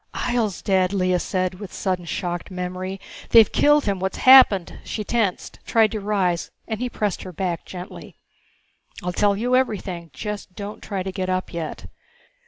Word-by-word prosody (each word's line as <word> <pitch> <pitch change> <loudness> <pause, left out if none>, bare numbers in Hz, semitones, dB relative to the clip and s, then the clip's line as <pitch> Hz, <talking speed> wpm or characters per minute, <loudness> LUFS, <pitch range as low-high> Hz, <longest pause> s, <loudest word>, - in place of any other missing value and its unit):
"Ihjel's 230 -6 -1
dead!" 190 -1 +2
Lea 185 -2 +1
said 185 0 -2
with 205 -4 -8
sudden 185 -3 -2
shocked 175 +2 -4
memory. 185 +1 -5 0.3
"They've 225 -3 +7
killed 295 0 +4
him! 200 -2 0
What's 190 +1 -2
happened?" 255 -9 +6
she 215 - -4
tensed, 210 -4 -1
tried 220 -2 +3
to 220 - -3
rise, 195 -4 0 0.2
and 220 -2 -3
he 250 0 -2
pressed 210 -4 -2
her 185 - -8
back 175 -1 -3
gently. 180 +2 -9 0.9
"I'll 180 0 -2
tell 200 +1 +2
you 245 +4 +1
everything. 190 -9 -1
Just 205 +3 -6
don't 205 +1 -7
try 195 -3 -4
to 190 - -4
get 185 -1 -3
up 185 0 -2
yet. 165 -2 -5
190 Hz, 170 wpm, -23 LUFS, 180-215 Hz, 0.9 s, They've